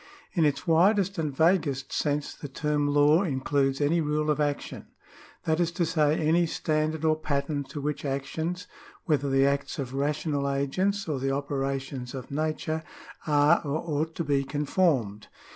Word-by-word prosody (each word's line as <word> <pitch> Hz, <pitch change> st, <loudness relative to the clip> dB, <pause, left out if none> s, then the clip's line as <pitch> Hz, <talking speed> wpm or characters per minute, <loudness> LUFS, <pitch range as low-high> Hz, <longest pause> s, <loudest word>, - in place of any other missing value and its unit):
In 165 Hz, -5 st, +3 dB
its 145 Hz, +2 st, 0 dB
widest 190 Hz, +3 st, +3 dB
and 155 Hz, -2 st, -1 dB
vaguest 145 Hz, -3 st, +1 dB
sense 145 Hz, -1 st, -1 dB
the 145 Hz, -, -8 dB
term 150 Hz, +1 st, -1 dB
law 145 Hz, +3 st, +4 dB
includes 135 Hz, -4 st, 0 dB
any 155 Hz, +4 st, +2 dB
rule 150 Hz, 0 st, 0 dB
of 150 Hz, -, -1 dB
action: 145 Hz, -1 st, -2 dB, 0.6 s
that 160 Hz, +1 st, +1 dB
is 175 Hz, -2 st, +2 dB
to 170 Hz, -, 0 dB
say, 155 Hz, -2 st, +2 dB
any 165 Hz, +2 st, +3 dB
standard 155 Hz, 0 st, -1 dB
or 155 Hz, 0 st, +4 dB
pattern 145 Hz, -1 st, -2 dB
to 145 Hz, -, -7 dB
which 150 Hz, +1 st, -3 dB
actions 160 Hz, +6 st, -3 dB, 0.4 s
(whether 145 Hz, -4 st, +1 dB
the 135 Hz, 0 st, +4 dB
acts 140 Hz, 0 st, -1 dB
of 135 Hz, -3 st, -4 dB
rational 145 Hz, 0 st, -1 dB
agents 185 Hz, +9 st, 0 dB
or 150 Hz, -4 st, -1 dB
the 135 Hz, +1 st, -1 dB
operations 135 Hz, -2 st, -3 dB
of 130 Hz, 0 st, -8 dB
nature) 155 Hz, +2 st, -2 dB, 0.5 s
are 150 Hz, +2 st, +4 dB
or 145 Hz, 0 st, -1 dB, 0.2 s
ought 160 Hz, +1 st, -3 dB
to 170 Hz, -, -2 dB
be 140 Hz, -2 st, +1 dB
con 145 Hz, +2 st, -3 dB
formed. 130 Hz, -, +1 dB
150 Hz, 165 wpm, -27 LUFS, 140-160 Hz, 0.6 s, law